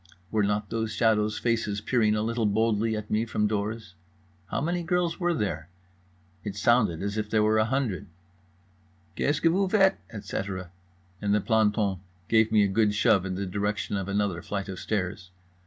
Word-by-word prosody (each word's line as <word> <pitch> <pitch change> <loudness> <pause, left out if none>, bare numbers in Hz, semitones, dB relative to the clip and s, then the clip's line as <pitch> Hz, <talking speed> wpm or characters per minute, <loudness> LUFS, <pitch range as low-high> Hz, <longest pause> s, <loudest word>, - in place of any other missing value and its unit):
Were 110 - +2
not 105 0 -1
those 110 -1 -1
shadows' 110 -2 +2
faces 115 -4 0
peering 110 -1 +2
a 105 - 0
little 115 -1 0
boldly 110 +1 +1
at 105 0 -7
me 110 +1 +2
from 110 -2 -1
doors? 105 -1 -2 0.5
How - - -2
many 175 +4 -1
girls 175 0 0
were 175 -1 +1
there—it 90 - -7
sounded 105 -7 +2
as 100 +1 -2
if 105 0 -3
there 110 -1 +2
were 110 0 +3
a 110 - +3
hundred— 120 -6 -1 1.1
"Qu'est 145 - +1
ce - - -3
que 165 - +4
vous 190 +2 +1
faites," 195 -2 +4
etc., 95 -4 -5 0.5
and 105 0 +2
the - - +3
planton 105 -3 +1 0.3
gave 110 -1 +4
me 105 -1 +5
a - - +3
good 105 +1 +2
shove 95 -2 +3
in 95 - -3
the 100 +1 -3
direction 100 +2 -2
of 95 -1 -2
another 100 -3 -1
flight 100 -1 -4
of 95 -2 -6
stairs. 95 -3 -3
105 Hz, 180 wpm, -27 LUFS, 100-115 Hz, 1.1 s, me